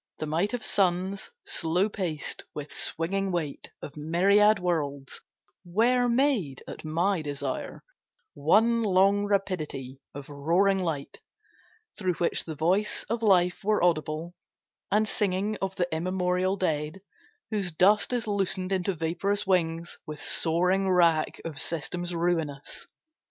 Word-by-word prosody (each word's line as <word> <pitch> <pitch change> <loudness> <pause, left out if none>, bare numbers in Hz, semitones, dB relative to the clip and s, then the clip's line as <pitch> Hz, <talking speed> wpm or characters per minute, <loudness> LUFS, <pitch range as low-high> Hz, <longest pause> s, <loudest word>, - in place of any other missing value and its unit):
The - - -3
might 170 +9 0
of 230 - -5
suns, 190 +1 0 0.2
slow 175 +4 +1
paced 180 -8 -4
with 150 0 -6
swinging 195 +4 -1
weight 160 -5 -3
Of 145 - -8
myriad 195 +7 +4
worlds, 145 -7 -2 0.4
were 240 +7 +2
made 235 - +1
at - - -8
my 170 +4 0
desire 140 -3 -4 0.5
One 225 +10 +3
long 200 0 +3
rapidity 155 -10 -2
of 140 -1 -7
roaring 170 +7 +2
light, 160 -6 -3 0.8
Through 185 -3 0
which 170 +1 0
the 160 - -5
voice 180 +7 0
of 230 0 -1
Life 180 -4 +3
were 210 -2 +2
audible, 160 0 0 0.6
And 215 +1 +3
singing 205 +1 0
of 190 0 -2
the 175 - 0
immemorial 180 +2 0
dead 155 0 -1 0.5
Whose 200 -5 -1
dust 200 +9 +4
is 245 -1 -1
loosened 195 -2 -1
into 190 0 0
vaporous 175 +6 -1
wings 170 -3 0
With 150 -1 -6
soaring 180 +6 +2
wrack 170 -4 +3
of 160 -4 -5
systems 175 +2 -2
ruinous. 165 -5 -2
180 Hz, 130 wpm, -27 LUFS, 160-200 Hz, 0.8 s, myriad